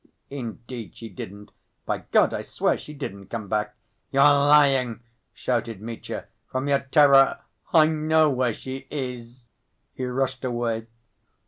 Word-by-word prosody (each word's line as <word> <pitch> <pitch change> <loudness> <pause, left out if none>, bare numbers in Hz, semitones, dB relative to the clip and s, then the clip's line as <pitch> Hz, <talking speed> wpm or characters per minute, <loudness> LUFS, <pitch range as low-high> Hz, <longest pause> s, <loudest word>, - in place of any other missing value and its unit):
"Indeed 120 -3 -7
she 115 - -8
didn't. 100 +2 -9 0.3
By - - -1
God - - +4
I - - -2
swear - - 0
she - - -10
didn't 100 -10 -7
come 110 -3 -5
back." 105 +1 -1 0.3
"You're 135 0 +4
lying!" 140 -4 +4 0.3
shouted 115 -4 -2
Mitya. 115 +2 -6 0.2
"From 130 +2 -3
your 140 -1 +3
terror 140 -1 +5 0.3
I 160 -2 +7
know 155 0 +3
where 125 -4 0
she 130 0 -7
is." 125 -3 -7 0.4
He 130 - -4
rushed 130 +1 -2
away. 120 -2 -2
130 Hz, 135 wpm, -25 LUFS, 115-140 Hz, 0.4 s, I